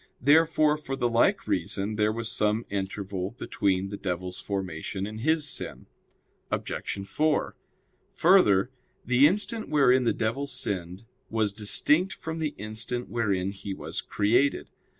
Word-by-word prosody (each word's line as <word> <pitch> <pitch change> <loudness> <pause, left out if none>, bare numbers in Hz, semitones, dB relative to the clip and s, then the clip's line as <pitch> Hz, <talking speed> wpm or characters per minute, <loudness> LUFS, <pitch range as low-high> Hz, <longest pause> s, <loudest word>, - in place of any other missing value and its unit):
Therefore, 155 +2 +4
for 135 -3 -5
the 120 - 0
like 115 0 +2
reason 100 +2 -1
there 105 0 +2
was 115 0 -3
some 105 +1 0
interval 100 0 -4
between 95 -4 -1
the 100 - -6
devil's 90 -1 -4
formation 95 -1 -4
and 110 +1 -7
his 155 +2 +1
sin. - - -5 0.6
Obj. 100 0 -4
4: 155 +9 0 0.6
Further, 130 - +4 0.3
the 125 +4 +5
instant 210 +5 -1
wherein 130 -4 +4
the 120 - +2
devil 115 +6 -2
sinned 95 -6 -4 0.2
was 110 -2 0
distinct 150 - +3
from 160 0 -6
the 155 -2 -2
instant 110 +4 -3
wherein 100 -5 0
he 100 0 -6
was - - -4
created. 120 +7 +1
110 Hz, 135 wpm, -27 LUFS, 100-140 Hz, 0.6 s, the